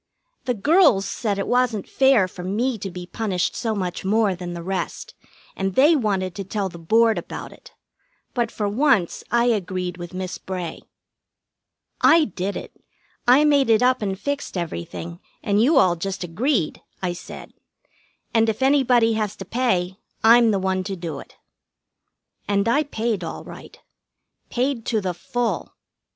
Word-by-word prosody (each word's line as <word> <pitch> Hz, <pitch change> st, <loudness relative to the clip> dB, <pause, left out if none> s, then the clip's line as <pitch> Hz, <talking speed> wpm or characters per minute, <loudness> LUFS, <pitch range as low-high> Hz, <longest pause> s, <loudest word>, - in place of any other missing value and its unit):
The 250 Hz, -2 st, 0 dB
girls 255 Hz, -, +4 dB
said 210 Hz, -4 st, -2 dB
it 195 Hz, -, -1 dB
wasn't 245 Hz, -5 st, +1 dB
fair 265 Hz, -8 st, +4 dB
for 180 Hz, 0 st, -9 dB
me 220 Hz, +6 st, -1 dB
to 195 Hz, -, -4 dB
be 180 Hz, 0 st, -7 dB
punished 185 Hz, -1 st, -2 dB
so 225 Hz, -2 st, -2 dB
much 185 Hz, -2 st, -3 dB
more 210 Hz, 0 st, +2 dB
than 175 Hz, -1 st, -6 dB
the 170 Hz, -, -6 dB
rest, 190 Hz, +1 st, -4 dB, 0.4 s
and 195 Hz, -1 st, -2 dB
they 295 Hz, +5 st, +6 dB
wanted 195 Hz, -, 0 dB
to 195 Hz, -, -5 dB
tell 195 Hz, 0 st, -2 dB
the 170 Hz, -, -11 dB
Board 220 Hz, +4 st, +3 dB
about -, -, -8 dB
it; -, -, -18 dB, 0.6 s
but 240 Hz, -3 st, 0 dB
for 210 Hz, -2 st, -3 dB
once 220 Hz, -, +1 dB
I 235 Hz, 0 st, +3 dB
agreed 185 Hz, -5 st, -1 dB
with 175 Hz, +1 st, -8 dB
Miss 185 Hz, -1 st, -4 dB
Bray. 180 Hz, -3 st, -5 dB, 1.2 s
"I 325 Hz, -1 st, +6 dB
did 195 Hz, -1 st, -4 dB
it. -, -, -9 dB, 0.5 s
I 265 Hz, +5 st, +6 dB
made 285 Hz, -4 st, +3 dB
it 225 Hz, +1 st, +4 dB
up 255 Hz, 0 st, +3 dB
and 195 Hz, -2 st, -2 dB
fixed 285 Hz, -7 st, -3 dB
everything, 170 Hz, -, -5 dB, 0.2 s
and 205 Hz, +1 st, +2 dB
you 280 Hz, +6 st, +4 dB
all 185 Hz, -9 st, +5 dB
just 185 Hz, +2 st, -4 dB
agreed," 190 Hz, -, -1 dB, 0.2 s
I 180 Hz, -1 st, 0 dB
said. 175 Hz, -, -10 dB, 0.8 s
"And 225 Hz, -1 st, +3 dB
if 220 Hz, +4 st, -2 dB
anybody 250 Hz, -4 st, +4 dB
has 215 Hz, -2 st, -2 dB
to 195 Hz, -, -8 dB
pay, 190 Hz, -5 st, 0 dB, 0.3 s
I'm 230 Hz, +1 st, +7 dB
the 205 Hz, -, +2 dB
one 190 Hz, 0 st, -1 dB
to 195 Hz, -, -3 dB
do 170 Hz, -4 st, -5 dB
it." -, -, -13 dB, 1.1 s
And 200 Hz, +1 st, +1 dB
I 290 Hz, +6 st, +2 dB
paid 230 Hz, -5 st, -2 dB
all -, -, -6 dB
right. -, -, -12 dB, 0.7 s
Paid 250 Hz, -1 st, -1 dB
to 225 Hz, -, +1 dB
the 185 Hz, -3 st, -2 dB
full. 240 Hz, +7 st, -3 dB
205 Hz, 165 wpm, -23 LUFS, 185-240 Hz, 1.2 s, I'm